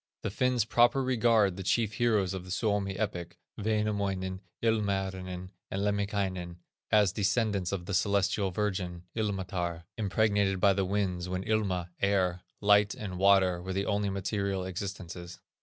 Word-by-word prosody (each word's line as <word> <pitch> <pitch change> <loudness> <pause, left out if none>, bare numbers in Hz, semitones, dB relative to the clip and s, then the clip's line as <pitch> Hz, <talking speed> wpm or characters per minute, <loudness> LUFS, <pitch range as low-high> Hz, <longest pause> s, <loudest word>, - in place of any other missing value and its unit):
The - - -2
Finns 125 0 +1
proper 120 +4 +4
regard 115 -6 +3
the - - -4
chief 110 +3 +1
heroes 105 -5 +2
of 95 -2 -5
the 90 - -12
Suomi 100 -1 0
epic, 90 -5 -3 0.2
Wainamoinen, 100 -3 -1 0.2
Ilmarinen, 95 -4 -1 0.2
and 95 +1 -2
Lemminkainen, 100 -4 -1 0.3
as 105 -3 +4
descendants 100 -3 +1
of 95 -3 -3
the 100 - -4
Celestial 100 +1 +2
Virgin, 90 -3 -2
Ilmatar, 95 -5 -2 0.2
impregnated 100 -2 +2
by 100 +1 +5
the 95 0 0
winds 90 -2 -1
when 95 +1 -2
Ilma 95 -5 0
(air), 95 -3 +2 0.2
Light, 105 0 +4
and 95 -4 -6
Water 95 -2 +4
were 95 +1 -4
the 100 +1 -1
only 100 -1 0
material 100 -1 -2
existences. 90 -2 -6
100 Hz, 140 wpm, -30 LUFS, 95-105 Hz, 0.3 s, by